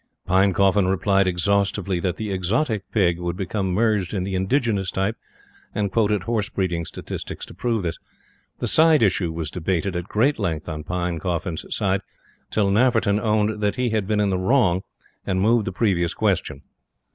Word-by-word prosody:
Pinecoffin 95 +1 +3
replied 95 +1 +2
exhaustively 100 +1 0
that 90 0 -1
the 105 0 -4
exotic 100 - -1
Pig 90 -6 +2
would 85 0 -3
become 95 0 -2
merged 105 -1 +1
in 95 - -1
the 95 +1 -4
indigenous 100 0 0
type; 95 +4 -1 0.6
and 100 -1 -1
quoted 105 -3 +1
horse 110 -2 -1
breeding 85 -3 -2
statistics - - -7
to - - -13
prove 115 +2 -1
this. 85 -1 -3 0.6
The - - -2
side 160 -4 +5
issue 90 -4 +1
was 80 -2 -4
debated, 90 +1 -1
at 85 0 -2
great 120 +8 +1
length 80 -6 -2
on 75 -2 -5
Pinecoffin's 85 0 -2
side, 95 -1 0 0.5
till 100 -2 +1
Nafferton 110 -2 +3
owned 105 0 0
that 105 -1 +1
he 125 -2 0
had 110 -3 0
been 105 0 +1
in 100 -1 +2
the 95 - 0
wrong, 95 -3 +3 0.4
and 95 -2 -1
moved 110 +2 +3
the - - -1
previous 90 -4 0
question. 70 - -1
95 Hz, 170 wpm, -23 LUFS, 90-105 Hz, 0.6 s, side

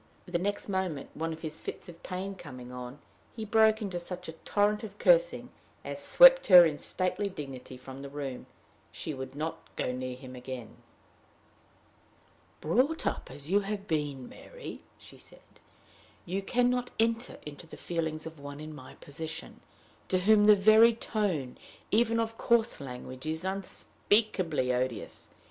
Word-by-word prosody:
The 175 -2 -1
next 205 +3 -2
moment, 190 -7 -2
one 165 +1 -3
of 160 0 -7
his 155 -1 -4
fits - - -6
of 170 -1 -12
pain 190 +1 -4
coming 130 -9 -10
on, 125 +1 -7 0.4
he 220 -2 -5
broke 220 +1 +4
into 185 -4 -3
such 180 +1 -7
a - - -4
torrent 205 +6 0
of 205 -2 -8
cursing - - +3 0.3
as - - -5
swept - - +8
her 180 -2 +10
in 150 -3 -1
stately 195 +2 -2
dignity 135 -6 -8
from 130 +1 -10
the 140 - -7
room. 140 -3 -6 0.4
She 155 - -5
would 130 0 -7
not 155 +2 -3 0.2
go - - -1
near 125 0 -4
him 130 0 -10
again. 125 -2 -8 1.8
"Brought 255 - +1
up - - -2
as 145 +5 -6
you 200 - +5
have 200 0 -4
been, 145 -7 -2
Mary," - - -10 0.2
she - - -15
said, - - -16 0.8
"you 190 +3 -2
can 245 +4 +2
not 250 0 -1
enter 230 +2 +1
into 150 +3 -9
the - - -11
feelings 160 -2 -3
of 160 -2 -9
one 145 0 -8
in 155 0 -7
my 130 -3 -11
position, 160 +3 -6 0.5
to 185 - +2
whom 210 +2 +5
the 210 - +9
very 220 +3 +6
tone 190 - -2 0.3
even 230 +1 +3
of 225 0 -2
coarse 235 -5 +2
language 130 +1 -8
is 160 +2 -2
unspeakably 190 - +1
odious. 125 -3 -3
170 Hz, 160 wpm, -30 LUFS, 140-210 Hz, 1.8 s, her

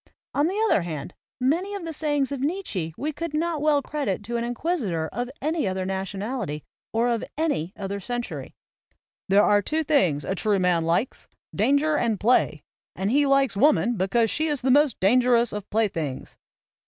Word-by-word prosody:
On 290 +2 +2
the 390 +4 -2
other 295 - +3
hand, 165 -1 -6 0.3
many 340 +11 0
of 385 -4 -6
the 325 - -4
sayings 290 -3 0
of 280 - -3
Nietzsche 280 - -2
we 300 +2 -2
could 320 +1 -5
not 325 -1 -1
well 295 -2 +3
credit 275 -11 -2
to 235 +3 -4
an 235 - 0
inquisitor 240 - -1
of 245 +3 -3
any 310 -5 0
other 185 0 -2
nation 190 +1 -3
ality 205 - -3 0.3
or 230 +2 +1
of 235 -2 0
any 290 - -1
other 200 0 -4
century. 240 +3 -5 0.7
"There 200 +2 +5
are 205 -1 +4
two 315 +10 -1
things 180 - +2
a 190 - -1
true 205 +1 +1
man 180 -3 +2
likes, 170 +10 -1 0.3
danger 290 +3 +2
and 225 -4 0
play; 245 +4 +2 0.3
and 195 +3 -1
he 285 +2 +3
likes 275 -5 +3
woman 245 0 +3
because 220 +4 +1
she 315 +1 0
is 295 -3 -1
the 260 +1 +2
most 290 -2 +4
danger 245 +5 +4
ous 235 0 +2
of 210 -1 -6
playthings." 170 -11 -2
240 Hz, 185 wpm, -25 LUFS, 195-295 Hz, 0.7 s, There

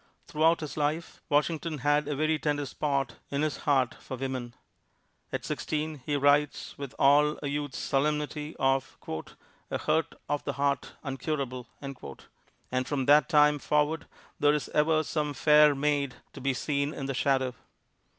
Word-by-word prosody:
Throughout 165 0 +2
his 155 -1 -6
life 155 +3 -2
Washington 155 +2 +1
had 145 +2 +2
a 150 - -1
very 155 +2 +1
tender 145 -1 0
spot 135 -3 -2
in 140 +1 -1
his 155 - -1
heart 130 -3 +3
for 130 - -6
women. 130 -2 -4 0.8
At - - -3
sixteen, 155 -2 -3
he 145 - -1
writes 145 +1 +2
with 140 -3 -7
all 150 +2 +5
a - - -1
youth's 145 -1 -3
solemnity 150 +2 -1
of 135 0 +1 0.7
"a - - -1
hurt 155 +1 0
of 145 0 -1
the 140 - -2
heart 140 0 -1
uncurable." 135 -3 -3 1.0
And 130 0 0
from 135 -3 -1
that 145 +2 +5
time 150 -2 +5
forward 150 +3 0 0.3
there 145 0 +4
is 150 - -3
ever 155 +1 +3
some 150 -2 -2
"Faire 150 +1 +6
Mayde" 140 -2 0 0.2
to - - -9
be 135 0 0
seen 140 +3 -1
in 135 - -4
the 135 - -2
shadow. 130 -1 +1
145 Hz, 155 wpm, -29 LUFS, 135-150 Hz, 1.0 s, Faire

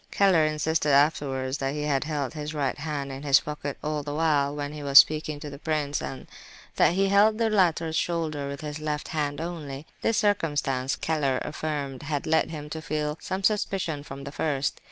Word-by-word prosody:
Keller 185 -6 +4
insisted 155 0 0
afterwards 140 -2 +2
that 135 +1 -2
he 150 - -2
had 145 -1 0
held 150 -3 -2
his 150 0 -5
right 140 -1 -1
hand 140 -2 -3
in 135 0 -7
his 140 -1 +5
pocket 150 -1 -5
all 150 0 -1
the 145 0 -5
while, 145 -3 +2
when 145 0 -4
he 150 - -7
was 140 -1 +4
speaking 155 -1 +6
to 150 - -7
the 140 - -9
prince, 150 -3 -1
and 135 - -6 0.5
that - - +5
he 195 +2 +2
had 195 - +1
held 210 +2 +5
the 225 -1 +1
latter's 170 -5 +2
shoulder 155 -4 -1
with 140 0 -6
his 150 0 -5
left 150 -1 -3
hand 145 -2 -2
only. 155 -4 -5 0.2
This 225 - +1
circumstance, 145 -10 +1
Keller 145 -5 0
affirmed, 145 -4 -4
had 145 -1 -3
led 160 0 +2
him 150 -2 -6
to 160 - -4
feel 150 -1 -2
some 190 +1 -3
suspicion 190 -7 0
from 140 -1 -9
the 140 - -6
first. 140 -2 -1
150 Hz, 200 wpm, -26 LUFS, 140-160 Hz, 0.5 s, speaking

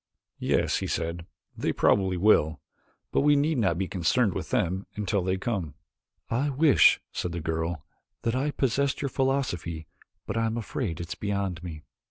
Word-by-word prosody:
"Yes," - - +1
he - - -3
said, 85 +1 -3 0.3
"they - - -1
probably 95 -2 +2
will. 80 -6 +4 0.5
But - - +2
we 145 +1 +5
need 145 0 +2
not 95 -6 +2
be 95 0 -1
concerned 100 +4 +1
with - - -4
them 95 +3 0
until 105 -1 0
they 95 +1 0
come." 95 - -3 0.5
"I 130 +6 0
wish," 145 +1 +5
said 90 - -3
the 85 - -3
girl, 80 -1 -2 0.4
"that 115 +1 0
I 135 +3 0
possessed 140 +1 0
your 140 - 0
philosophy 125 - -1 0.4
but - - -3
I 115 0 +2
am 110 +1 -2
afraid 110 - -3
it 85 -1 -6
is - - -2
beyond 100 -4 -2
me." 80 -4 -7
100 Hz, 175 wpm, -27 LUFS, 85-125 Hz, 0.5 s, we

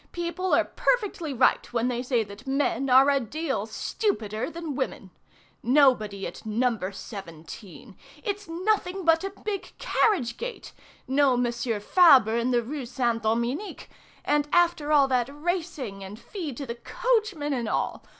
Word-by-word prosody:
People 345 +2 -3
are - - +4
perfectly 400 -10 -1
right 255 -1 +2
when 235 0 0
they 245 -1 -1
say 245 -3 +1
that 205 +5 -12
men 270 -1 0
are 260 +2 +7
a 280 - +3
deal 270 -2 -3
stupider 220 - -2
than 330 -2 -5
women! 260 -8 -4 0.5
Nobody 235 -7 +3
at 170 - -8
No. 235 +3 +1
17. 190 +1 -10 0.3
It's 410 -1 -4
nothing 370 +1 -1
but 325 +1 +4
a 390 - -2
big 400 0 -6
carriage 255 - +1
gate! - - -7 0.3
No 270 -1 +3
Monsieur 240 -2 -1
Fabre 260 - +6
in 235 +1 0
the 240 -2 +2
Rue 270 +1 -5
Saint 235 -2 -1
Dominique! 235 - -2 0.3
And 295 0 +2
after 345 -4 +2
all 285 -2 +5
that 250 -1 +1
racing 295 - -4
and 195 +2 -8
fee 335 - -6
to 275 +4 -6
the 235 - -4
coachman 420 - 0
and 240 -4 -2
all! - - -2
270 Hz, 150 wpm, -26 LUFS, 235-335 Hz, 0.5 s, are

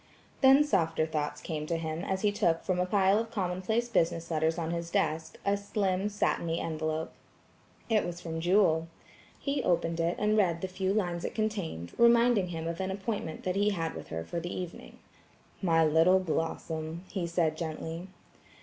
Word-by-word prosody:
Then 270 +2 +7
softer 165 - +1
thoughts 150 -2 -3
came 155 -2 -4
to 170 - 0
him 160 +1 -3
as 190 -1 -2
he 210 - +4
took 180 -6 +1
from 185 -1 0
a 180 - +1
pile 195 +1 +3
of 225 0 -3
commonplace, 200 +3 -1
business 170 -6 0
letters 160 +1 +1
on 165 -1 -2
his 170 0 -3
desk, 160 -1 -1
a 200 0 +3
slim 200 -1 -1
satiny 170 -5 0
envelope. 155 0 -2 0.7
It 220 -2 +3
was 175 0 -5
from 165 -2 -5
Jewel. 170 -3 +3 0.5
He 280 -1 -1
opened 170 -3 +1
it 170 +1 +1
and 210 +1 +2
read 175 -6 +2
the 190 - -2
few 185 +1 -1
lines 175 -5 -1
it - - -4
contained, 195 - -3
reminding 235 -4 +5
him 165 -2 -4
of 165 0 -4
an 190 0 -1
appointment 190 -4 -4
that 185 0 -1
he 205 +1 +3
had 165 -5 -2
with - - -8
her 80 0 -4
for 170 - -3
the 175 +1 -5
evening. 180 -2 -7 0.6
"My 165 -4 +4
little 165 +4 +5
Blossom!" 165 -1 -3
he 180 -4 -2
said 165 -2 +1
gently. 165 +2 -5
175 Hz, 180 wpm, -30 LUFS, 165-200 Hz, 0.7 s, Then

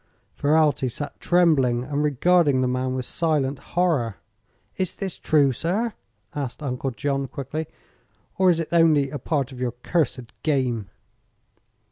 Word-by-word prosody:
Ferralti 145 -3 +2
sat 145 +5 -6
trembling 145 -9 +3
and 145 +2 -2
regarding 150 -1 +3
the 130 - +2
man 130 +1 -1
with 130 -1 -3
silent 145 -4 0 0.2
horror. 145 - +2 0.6
"Is 185 -2 -2
this 190 -3 -5
true, 145 -3 +3
sir?" 200 - -1 0.4
asked 140 0 -5
Uncle 130 -1 -2
John, 135 +2 -2
quickly; 145 +4 -5 0.7
"or 190 -1 +5
is 170 -2 +3
it 165 - -3
only 160 -5 +4
a 145 - -4
part 140 -4 -1
of 130 - -10
your 125 -2 -1
cursed 130 -7 -1
game?" 125 -9 0
145 Hz, 140 wpm, -24 LUFS, 130-160 Hz, 0.7 s, or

